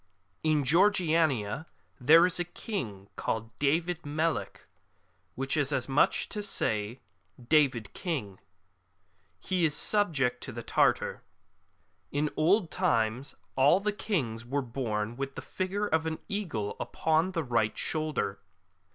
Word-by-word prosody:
In 155 -2 +2
Georgiania 160 - +2 0.3
there 160 +7 +7
is 180 -1 0
a - - +2
King 125 - -5
called 115 0 -3
David 165 +4 +1
Melic, 155 +2 -2 0.7
which 135 +3 -1
is 145 -2 +1
as 130 -3 0
much 135 +2 +3
as - - -3
to 210 - -4
say 115 - -1 0.2
'' 120 - -20
David 125 -8 -1
King 125 - -4 0.5
"; 90 0 -42
he 185 -2 -1
is 150 -2 +2
subject 145 -12 +1
to - - -6
the 120 -1 -7
Tartar,^ - - +1 0.9
In 145 +1 0
old 175 +3 +3
times 125 - 0 0.2
all 140 +7 +5
the 210 +1 -1
kinos 135 - -2
were 135 +4 -2
born 115 -2 -3
with 135 0 -4
the - - -5
figure 190 +3 -2
of 160 -4 0
an 160 0 -2
eagle 175 - -3
upon 160 +4 0
the 165 -3 -1
right 115 -5 0
shoulder. 155 -11 -1
145 Hz, 140 wpm, -29 LUFS, 120-170 Hz, 0.9 s, there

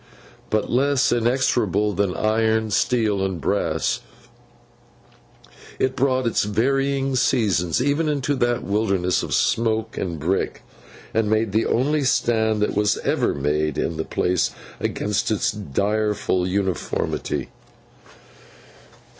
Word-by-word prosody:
But, 110 -1 0
less 135 +1 +2
inexorable 115 -4 +1
than 100 -3 0
iron, 110 0 +1
steel, 105 -2 +1
and 95 -3 -2
brass, - - 0 1.8
it 130 0 0
brought 130 -1 +1
its 115 - +1
varying 135 +5 0
seasons 100 - +1
even 145 +4 +1
into 145 -1 0
that 120 0 0
wilderness 100 -3 0
of - - -2
smoke 110 -1 0
and 85 -4 -3
brick, 90 +6 -1 0.5
and 110 -1 +1
made 110 -1 +1
the 110 +2 +1
only 145 +4 +1
stand 110 -4 +1
that - - +1 0.3
ever - - +1
was 70 - -6
made 75 +1 0
in 85 - -1
the 80 - -1
place 90 0 0 0.3
against 105 -1 -1
its 110 +2 +1
direful 105 0 -1
uniformity. 95 -3 -2
110 Hz, 115 wpm, -22 LUFS, 95-125 Hz, 1.8 s, less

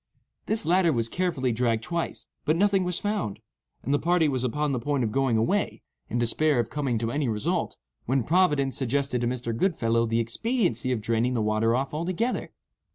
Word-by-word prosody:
This 220 +1 +2
latter 175 0 +3
was 115 -5 0
carefully 160 -5 -1
dragged 115 -1 0
twice, 170 +6 -3 0.2
but 155 - +2
nothing 195 +1 +3
was 180 -1 -1
found; 205 - -2 0.5
and 135 - -1
the 145 - +3
party 170 -1 +2
was 130 -3 0
upon 150 +4 0
the 130 - -1
point 140 +1 -1
of 110 - -1
going 130 -1 +1
away, 110 +2 0 0.3
in 120 - -1
despair 135 +5 +2
of 120 -1 -1
coming 140 -5 -1
to 115 +1 -2
any 145 -1 0
result, 105 -1 -1 0.3
when 130 0 +1
Providence 150 -5 +2
suggested 135 -1 0
to 120 - 0
Mr. 120 -2 -2
Goodfellow 115 -7 +1
the 115 +1 +1
expediency 130 - 0
of 120 -3 -1
draining 115 +3 0
the - - +1
water 110 +2 +2
off 135 +3 -2
altogether. 185 +10 -2
130 Hz, 190 wpm, -26 LUFS, 115-165 Hz, 0.5 s, latter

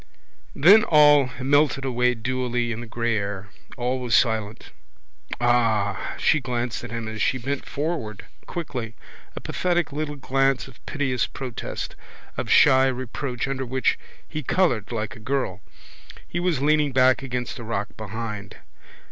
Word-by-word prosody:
Then 200 +9 +7
all 145 -4 +6
melted 140 +1 +2
away 125 -1 +1
dewily 125 0 -1
in 115 +1 -4
the 120 - -8
grey 115 0 -1
air: 100 -1 -4 0.3
all 125 +1 -1
was 125 -2 +1
silent. 110 -3 0 0.7
Ah! 115 -4 +1
She 155 - +3
glanced 120 -3 -3
at 120 - -6
him 115 0 -4
as 110 -1 -5
she 130 - +2
bent 135 +3 -4
forward 140 -9 -3 0.2
quickly, 125 -9 -5 0.4
a - - -4
pathetic 175 -3 -1
little 150 0 -3
glance 135 -1 +1
of 135 - -17
piteous 135 -4 0
protest, 130 -4 -6 0.4
of - - -4
shy 130 0 +6
reproach 130 0 -3
under 135 -1 -2
which 130 +1 0 0.3
he 155 - -4
coloured 130 - +1
like 110 -2 -3
a - - -12
girl. 110 -5 -2 0.7
He 175 - -3
was 175 -6 0
leaning 150 -2 +3
back 130 0 +4
against 125 -2 -4
the 120 - -7
rock 105 -2 -3
behind. 105 -1 -6
125 Hz, 150 wpm, -24 LUFS, 115-140 Hz, 0.7 s, Then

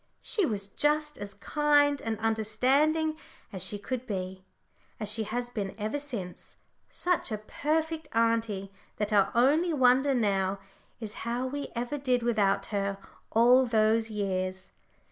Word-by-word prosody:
She 405 -5 +1
was 205 -3 -2
just 300 +8 0
as 200 -1 -7
kind 290 +4 +2
and 225 -1 -2
understanding 260 +9 +1 0.4
as 185 -2 +1
she 205 +2 -1
could 255 +4 -5
be, 185 -2 -4 0.6
as 215 -2 -1
she 220 0 +2
has 245 +3 -3
been 200 -5 -4
ever 215 +7 -2
since 230 -11 -7 0.3
such 355 -8 0
a 215 - -1
perfect 315 +8 -2
auntie 225 -4 0 0.3
that 210 0 -1
our 200 -2 +4
only 305 +8 +3
wonder 260 0 +4
now 195 -4 +1 0.4
is 215 -3 -6
how 240 +2 -2
we 285 +2 -4
ever 245 +5 -3
did 250 -3 +1
without 210 -4 +2
her 200 -1 -1 0.3
all 245 +3 +5
those 220 0 +2
years. 190 -3 -3
230 Hz, 145 wpm, -29 LUFS, 205-280 Hz, 0.6 s, all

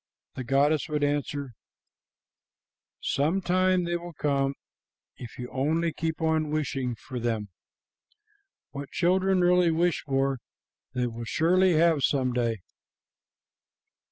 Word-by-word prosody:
The 130 - -5
goddess 145 +5 +2
would 150 -1 -1
answer, 145 -2 -1 1.5
'Some 155 +7 +1
time 185 0 +2
they 175 0 -1
will 175 0 -9
come, 140 -2 0 0.6
if 120 -3 -10
you 125 - -5
only 160 +5 0
keep 160 -1 -3
on 160 -1 +1
wishing 135 -5 -2
for 125 +2 -7
them. 115 -3 -2 1.2
What 140 -1 -7
children 185 +1 +2
really 180 -1 +4
wish 170 +1 +1
for 135 -1 0 0.6
they 125 0 +1
will 115 -1 -5
surely 180 +8 +3
have 160 -2 +3
some 130 -2 +1
day.' 115 -5 -1
150 Hz, 120 wpm, -27 LUFS, 130-170 Hz, 1.5 s, really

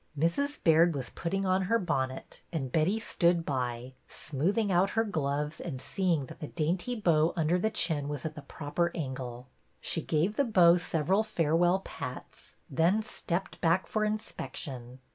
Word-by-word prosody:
Mrs. 280 - 0
Baird 165 0 +5
was 130 -3 -4
putting 195 +3 -2
on 185 0 +2
her 230 - +4
bonnet, 135 -9 -3
and 135 -7 -3
Betty 170 - +2
stood 170 -5 +1
by, 125 -2 -3
smoothing 190 - -1
out 185 +2 +3
her 225 - +5
gloves 150 -5 -2
and 140 -7 -5
seeing 170 -3 0
that - - -12
the 150 - -5
dainty 175 +11 -1
bow 165 -6 +3
under 165 +2 +2
the 220 - +1
chin 160 -9 0
was 145 -2 -4
at 160 - -3
the 150 - -9
proper 155 +4 -2
angle. 130 -5 -5 0.3
She - - -2
gave 170 +7 0
the 280 - +4
bow 180 -8 +6
several 175 +3 +1
farewell 175 -2 +2
pats, - - -8
then 180 +7 +2
stepped 190 -3 -4
back 170 +3 +3
for 215 - -1
inspection. 130 - -5
170 Hz, 160 wpm, -30 LUFS, 145-190 Hz, 0.3 s, bow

